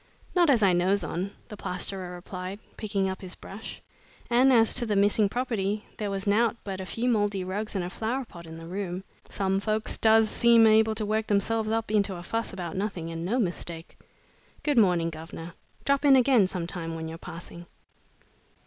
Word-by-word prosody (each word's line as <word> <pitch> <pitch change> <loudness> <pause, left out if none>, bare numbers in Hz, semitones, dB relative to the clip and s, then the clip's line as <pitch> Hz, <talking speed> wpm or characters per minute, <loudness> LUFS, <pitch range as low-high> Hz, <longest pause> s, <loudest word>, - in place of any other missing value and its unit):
"Not 350 -3 +4
as 240 -6 +4
I 190 -2 +5
knows 185 +3 +2
on," 185 +4 -3 0.2
the 210 - -7
plasterer 185 -1 -4
replied, 185 +2 -6 0.2
picking 200 -3 -1
up 190 0 -4
his 185 -1 -7
brush, 205 +3 -9 0.5
"and 255 +3 +5
as 225 -3 +5
to 240 - +2
the 210 - 0
missing 205 +1 +3
property, 215 -4 -2
there 210 -2 -2
was 195 -1 -3
nowt 225 +3 +2
but 190 -2 -5
a 185 - -7
few 235 +5 -2
mouldy 205 -5 +1
rugs 205 +4 -4
and 185 -2 -1
a - - -4
flower 245 +6 -2
pot 170 -6 -12
in 160 0 -9
the 165 - -9
room. 185 +1 -4 0.3
Some 195 -1 0
folks 215 +1 0
does 220 0 +5
seem 230 +1 +5
able 220 0 +5
to 215 0 -2
work 215 +1 0
themselves 215 +2 +1
up 225 -1 -1
into 205 -3 +1
a 175 - -8
fuss 225 +6 -2
about 175 -4 -5
nothing, 190 -4 -3
and 165 0 -5
no 210 +8 0
mistake! 170 -6 -2 0.7
Good 290 -5 +3
morning, 175 -5 +3
guvnor! 165 +1 -8 0.3
Drop 280 +1 +2
in 280 -2 +7
again 250 -6 +5
some 180 -2 -3
time 165 -2 -4
when 160 0 -5
you're 165 +1 -7
passing." 170 +1 -9
200 Hz, 195 wpm, -27 LUFS, 180-220 Hz, 0.7 s, in